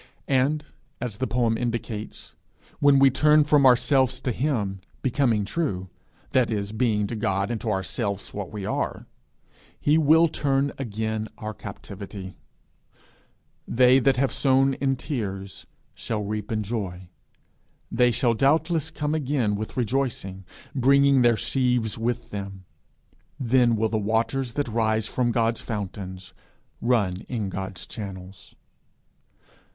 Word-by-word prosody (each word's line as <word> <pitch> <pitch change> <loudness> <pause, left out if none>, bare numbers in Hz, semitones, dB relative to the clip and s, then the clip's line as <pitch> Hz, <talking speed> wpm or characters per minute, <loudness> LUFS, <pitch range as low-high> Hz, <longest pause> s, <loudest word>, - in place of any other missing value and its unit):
And, 140 +3 +1 0.3
as 120 -4 -4
the 130 - -1
poem 115 -2 +1
indicates, 115 -3 -4 0.5
when 145 -1 +5
we 135 0 +6
turn 150 +3 +5
from 145 -2 +5
ourselves 130 0 +3
to 130 - -1
him, 110 -8 -1 0.2
becoming 120 -5 +1
true, 100 - -2 0.4
that 130 -2 +3
is, 100 -2 -2
being 110 -2 +1
to 115 - -4
God 100 -1 -1
and 115 - -3
to 115 - -2
ourselves 100 0 -2
what 100 -3 -5
we 105 -2 -5
are, - - -2 0.7
he 150 +2 +3
will 160 +2 +5
turn 140 -2 0
again 110 -2 -3
our 110 -2 -5
captivity; 95 -1 -8 1.3
they 125 +2 +5
that 135 +1 +3
have 135 +1 +1
sown 135 0 +3
in 135 0 0
tears 100 - -5 0.3
shall 105 -2 -3
reap 105 +1 -4
in 110 -1 0
joy; 95 -5 -4 0.8
they 125 +1 +4
shall 120 0 +2
doubtless 155 +5 +2
come 150 0 -2
again 135 -8 0
with 105 +4 -5
rejoicing, 115 -6 -2 0.3
bringing 140 +1 +4
their 120 -2 +4
sheaves 125 -4 0
with 120 +1 -2
them. 100 -2 -6 0.7
Then 125 -2 +3
will 110 0 +1
the 110 - 0
waters 115 +4 0
that 145 -2 -1
rise 110 -1 +1
from 120 +2 0
God's 115 0 +1
fountains, 95 -3 -6 0.5
run 110 -7 +1
in 110 -6 -2
God's 95 0 -5
channels. 95 -3 -9
115 Hz, 135 wpm, -25 LUFS, 105-135 Hz, 1.3 s, we